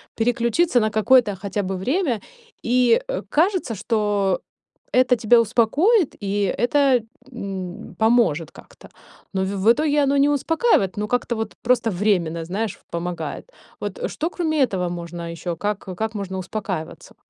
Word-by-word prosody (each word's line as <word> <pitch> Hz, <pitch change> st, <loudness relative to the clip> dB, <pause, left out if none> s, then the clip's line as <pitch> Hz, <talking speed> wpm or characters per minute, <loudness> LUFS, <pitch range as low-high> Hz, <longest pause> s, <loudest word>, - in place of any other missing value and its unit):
переключиться 240 Hz, +5 st, +2 dB
на 215 Hz, -1 st, +1 dB
какое-то 220 Hz, -1 st, +4 dB
хотя 200 Hz, +1 st, -3 dB
бы 190 Hz, +1 st, -3 dB
время. 260 Hz, -, 0 dB, 0.5 s
И, 250 Hz, -, +4 dB
э, -, -, -2 dB
кажется, 335 Hz, -, +1 dB
что 205 Hz, -3 st, 0 dB, 0.5 s
это 250 Hz, 0 st, +4 dB
тебя 230 Hz, +1 st, +4 dB
успокоит, 280 Hz, -, +2 dB
и 200 Hz, -1 st, 0 dB
это, 265 Hz, +1 st, +3 dB, 0.3 s
м, 195 Hz, -2 st, -6 dB
поможет 220 Hz, -9 st, +2 dB
как-то. -, -, -16 dB, 0.4 s
Но 190 Hz, 0 st, 0 dB
в -, -, -3 dB, 0.2 s
в 225 Hz, -, +5 dB
итоге 295 Hz, +1 st, +2 dB
оно 280 Hz, +1 st, +2 dB
не 280 Hz, +1 st, +4 dB
успокаивает, 290 Hz, -, +1 dB
но 210 Hz, 0 st, -2 dB
как-то 245 Hz, 0 st, -1 dB
вот 220 Hz, -1 st, -4 dB
просто 235 Hz, -2 st, +2 dB
временно, 175 Hz, -4 st, 0 dB
знаешь, 200 Hz, +4 st, -3 dB
в -, -, -30 dB
помогает. 175 Hz, -, -5 dB, 0.3 s
Вот -, -, -4 dB
что 325 Hz, +3 st, -2 dB
кроме 315 Hz, -6 st, 0 dB
этого 180 Hz, -5 st, -2 dB
можно 170 Hz, 0 st, -6 dB
ещё? 170 Hz, 0 st, -4 dB
Как 205 Hz, +1 st, -2 dB, 0.2 s
как 220 Hz, 0 st, -3 dB
можно 190 Hz, -2 st, -4 dB
успокаиваться? 185 Hz, -3 st, -5 dB
220 Hz, 150 wpm, -22 LUFS, 190-260 Hz, 0.5 s, в